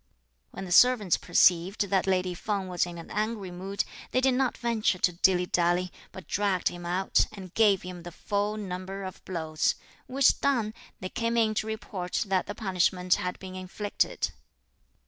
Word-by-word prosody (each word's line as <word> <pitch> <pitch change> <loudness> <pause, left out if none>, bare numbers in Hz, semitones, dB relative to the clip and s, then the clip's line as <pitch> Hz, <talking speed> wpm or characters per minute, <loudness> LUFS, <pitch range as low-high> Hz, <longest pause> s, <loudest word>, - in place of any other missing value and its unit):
When 195 - -7
the 180 - -8
servants 220 -2 +5
perceived 180 +4 +3
that 195 -1 +2
lady 185 -1 +1
Feng 195 +1 -3
was 180 -1 0
in 175 -1 -8
an 165 - -10
angry 210 -3 -2
mood, 190 +3 -3 0.3
they 255 - +1
did 260 0 +3
not 260 0 0
venture 230 -5 +1
to 180 - +2
dilly 180 +1 +3
dally, 175 +1 +1 0.2
but 190 - -11
dragged 200 -3 +1
him 175 -1 -8
out, 185 +2 +2
and 190 -4 -10
gave 205 -4 +4
him 180 -1 -7
the 175 +1 -8
full 205 +4 -2
number 190 -1 -5
of 185 -1 -8
blows; 160 -4 -1 0.3
which 270 +1 +3
done, 235 -6 +1 0.3
they 185 - -4
came 230 +2 -1
in 220 -2 +3
to 215 +1 -2
report 200 -4 -3
that 190 -1 +1
the 205 - -5
punishment 185 -2 +1
had 180 0 -3
been 190 -1 -9
inflicted. 185 +2 -2
190 Hz, 175 wpm, -28 LUFS, 180-215 Hz, 0.3 s, servants